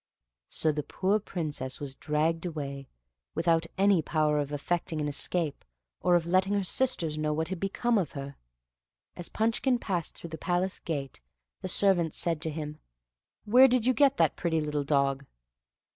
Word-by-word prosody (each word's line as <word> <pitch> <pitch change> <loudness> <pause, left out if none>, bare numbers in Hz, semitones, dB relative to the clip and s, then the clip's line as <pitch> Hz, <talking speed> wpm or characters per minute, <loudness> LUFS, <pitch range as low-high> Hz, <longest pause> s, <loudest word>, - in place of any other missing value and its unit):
So 155 - +2
the 150 0 -2
poor 190 +8 0
Princess 150 -9 -4
was 140 -2 -4
dragged 155 +4 0
away, 140 -4 -5 0.5
without 165 0 +2
any 195 -3 +4
power 155 -1 +1
of 145 0 -2
effecting 160 +2 -2
an 150 - -1
escape, 150 +1 0 0.4
or 175 - +3
of 170 -2 +2
letting 185 +3 +2
her 200 -1 +1
sisters 175 -8 0
know 155 0 0
what 160 +2 -2
had 190 -2 -4
become 215 +4 +1
of 180 - -3
her. 140 0 -6 0.8
As 175 - -4
Punchkin 230 +3 +1
passed 180 -8 -3
through 170 - -9
the 160 - -6
palace 180 +2 -1
gate 140 - -5 0.4
the 185 - -4
servants 175 -4 +3
said 165 -3 -1
to 160 - -1
him, 150 0 -6 0.7
"Where 250 +5 +7
did 250 -2 +1
yon 255 - +4
get 275 +2 +4
that - - +3
pretty 165 -2 0
little 150 -1 -1
dog?" 140 -1 +1
165 Hz, 170 wpm, -29 LUFS, 150-190 Hz, 0.8 s, Where